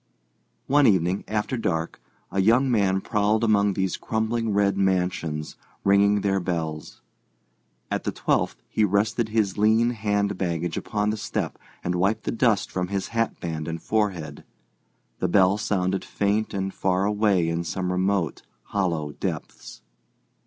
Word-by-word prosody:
One 145 0 +4
evening 95 -2 +2
after 110 +4 -1
dark 80 -7 -2 0.3
a 95 - +1
young 120 +6 +4
man 95 -4 +2
prowled 105 +2 +1
among 105 -2 +3
these 95 -1 -1
crumbling 110 0 -1
red 100 -1 +2
mansions, 90 -5 -1 0.3
ringing 100 +1 +4
their 95 -1 +1
bells. 80 -4 -4 0.9
At - - -1
the - - -1
twelfth - - -1
he 110 - 0
rested 105 +3 +1
his 105 -3 0
lean 110 +3 +4
hand 105 -3 -1
baggage 85 -2 -1
upon 105 0 -1
the 110 - -3
step - - -3 0.2
and 90 - -1
wiped 95 +5 +1
the - - -2
dust 115 -3 +1
from 90 -1 -2
his 100 0 -3
hatband 85 -9 -2
and 80 0 -3
forehead. 90 -9 -2 0.8
The 90 - +1
bell 95 +2 +4
sounded 95 -2 0
faint 105 +2 0
and 95 -1 -3
far 95 0 +1
away 105 -4 +2
in 85 +1 -1
some 90 +2 -2
remote, 95 -3 0 0.2
hollow 85 -7 -1
depths. - - -6
100 Hz, 145 wpm, -25 LUFS, 90-105 Hz, 0.9 s, One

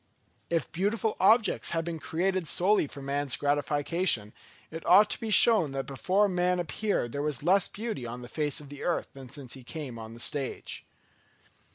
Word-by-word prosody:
If 165 -3 -1
beautiful 210 +5 -1
objects 220 +3 +3
had 165 -1 -2
been 170 -1 -4
created 185 +2 -1
solely 190 0 +3
for 140 0 -10
man's 140 -1 0
gratification, 145 - 0 0.4
it 165 +1 -7
ought 205 +4 +6
to - - -2
be 225 - -4
shown 210 -9 +6
that 135 0 -3
before 185 +10 +1
man 180 -1 0
appeared 175 - -2
there 140 - -3
was 145 -3 -3
less 190 +3 +3
beauty 210 - -5
on 120 +1 -7
the - - -8
face 150 +3 -1
of 145 -2 -12
the 145 0 -10
earth 175 - -1
than 135 -2 -11
since 130 -2 -8
he 130 - -10
came 130 -3 -7
on 110 0 -9
the - - -12
stage. 135 +2 -4
160 Hz, 185 wpm, -28 LUFS, 135-185 Hz, 0.4 s, ought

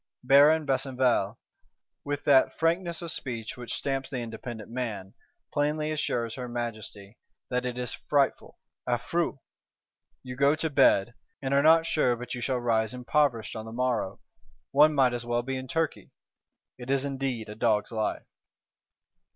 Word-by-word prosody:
Baron 145 +4 +6
Besenval, 130 -5 +1 0.7
with 145 0 -3
that 140 -2 +4
frankness 170 +1 0
of 170 - -4
speech 115 -4 -4
which 120 -1 -5
stamps 135 -1 -2
the 135 - -4
independent 115 -1 -7
man, 110 -6 -4 0.4
plainly 150 +1 0
assures 120 -7 -1
her 125 -2 -6
Majesty 110 -3 -6 0.3
that 125 0 0
it 125 0 -4
is 125 -1 -2
frightful 140 -2 0 0.3
(affreux); 150 +6 0 0.9
'you 125 -1 -7
go 140 +3 +4
to 160 0 -2
bed, 120 -5 +4 0.3
and 135 0 -2
are 140 - +5
not 160 +2 +6
sure 125 -7 +2
but 125 +1 -7
you 120 - -5
shall 130 +2 0
rise 115 -1 0
impoverished 125 -2 0
on 110 0 -6
the 110 - -8
morrow: 120 -5 -1 0.5
one 150 +2 +5
might 130 -3 +4
as 120 -1 -3
well 120 0 -1
be 135 +2 -3
in 130 0 -5
Turkey.' 165 +3 -2 0.7
It 125 +1 -9
is 135 0 +1
indeed 135 -5 -3
a 105 - -7
dog's 110 -1 +1
life. 110 -2 -2
125 Hz, 155 wpm, -28 LUFS, 120-140 Hz, 0.9 s, Baron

